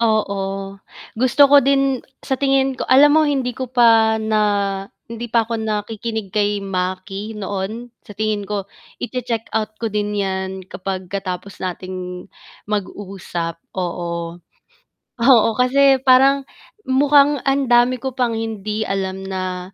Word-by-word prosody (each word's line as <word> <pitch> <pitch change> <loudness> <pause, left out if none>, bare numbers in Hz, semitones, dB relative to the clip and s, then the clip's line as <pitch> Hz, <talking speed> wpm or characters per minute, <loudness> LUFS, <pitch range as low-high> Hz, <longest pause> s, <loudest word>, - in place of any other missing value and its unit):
Oo, 195 -3 -1 0.4
gusto 260 +4 +5
ko 280 -2 +6
din, 275 -2 +2 0.2
sa 265 - -2
tingin 270 0 +1
ko - - -3
alam 290 +4 +6
mo, 315 - +5
hindi 265 -5 -1
ko 260 - -3
pa 225 -2 +5
na 220 0 +1 0.7
hindi 230 +1 -6
pa 230 -1 +2
ako 230 - -1
nakikinig 220 0 -3
kay 205 +1 0
Maki 195 +2 -4
noon 210 +3 -5 0.2
sa 210 - -11
tingin 215 0 -2
ko 200 -1 -4 0.3
i-che-checkout 225 -3 -3
ko 230 - -1
din 210 0 -2
'yan 190 -1 -3
kapag 185 0 -5
katapos 195 0 -5
nating 180 0 -6 0.4
mag-usap, 190 -4 -4 0.2
oo, 170 -2 -4 0.8
oo, 235 -2 +5
kasi 270 +2 +4
parang 270 +1 +5 0.4
mukhang 285 +1 +4
ang 275 0 +1
dami 245 +1 +4
ko 260 +1 -5
pang 240 -3 0
hindi 220 -1 -3
alam 190 -1 -3
na 185 -1 -4
215 Hz, 130 wpm, -20 LUFS, 195-250 Hz, 0.8 s, ko